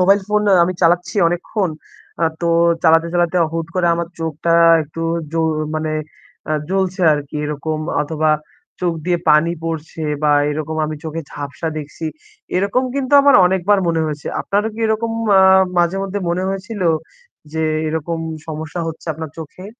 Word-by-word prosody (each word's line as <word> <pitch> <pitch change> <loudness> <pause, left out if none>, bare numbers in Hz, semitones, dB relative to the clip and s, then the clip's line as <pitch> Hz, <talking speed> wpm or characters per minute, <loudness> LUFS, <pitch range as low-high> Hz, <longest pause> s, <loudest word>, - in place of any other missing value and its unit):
Mobile 195 +2 +5
phone 210 0 +2 0.2
আমি 180 +2 +1
চালাচ্ছি 175 +4 +2
অনেকক্ষণ। 175 +2 -2 0.5
আ - - +5 0.2
তো 170 - 0 0.3
চালাতে, 165 0 +5
চালাতে 175 0 +1 0.2
হুট 165 -1 -2
করে 180 -2 +1
আমার 170 0 -3
চোখটা 165 +1 -1 0.3
একটু 155 +2 -9 0.3
জু 165 - -1 0.4
মানে 155 0 -2 0.6
আ - - +2 0.2
জ্বলছে 190 0 -1
আর 150 - +1
কি 150 - -6
এরকম 150 +1 -3 0.2
অথবা 155 +1 0 0.5
চোখ 175 -2 +1
দিয়ে 175 -1 +1
পানি 150 +3 +4
পড়ছে 160 0 -5 0.2
বা 150 - +3 0.2
এরকম 155 +1 -3
আমি 155 - -4
চোখে 160 +1 -4
ঝাপসা 145 +3 -5
দেখছি। 150 +2 -8 0.5
এরকম 200 +7 +1
কিন্তু 275 -1 -2
আমার 280 -1 +6
অনেকবার 190 +2 +2
মনে 165 -1 +1
হয়েছে। 150 -1 -5
আপনারও 205 +2 0
কি 225 - -7
এরকম 220 +1 0 0.2
ম্যা 195 -1 +6 0.4
মাঝে 175 +2 +2
মধ্যে 195 +1 -3
মনে 175 +2 -1
হয়েছিল? 195 +2 -4 0.7
যে 160 0 -1 0.3
এরকম 160 +1 -2 0.3
সমস্যা 160 +2 -5
হচ্ছে 160 +1 -9
আপনার 160 0 -6
চোখে? 160 +4 -9
170 Hz, 160 wpm, -18 LUFS, 155-190 Hz, 0.7 s, আমার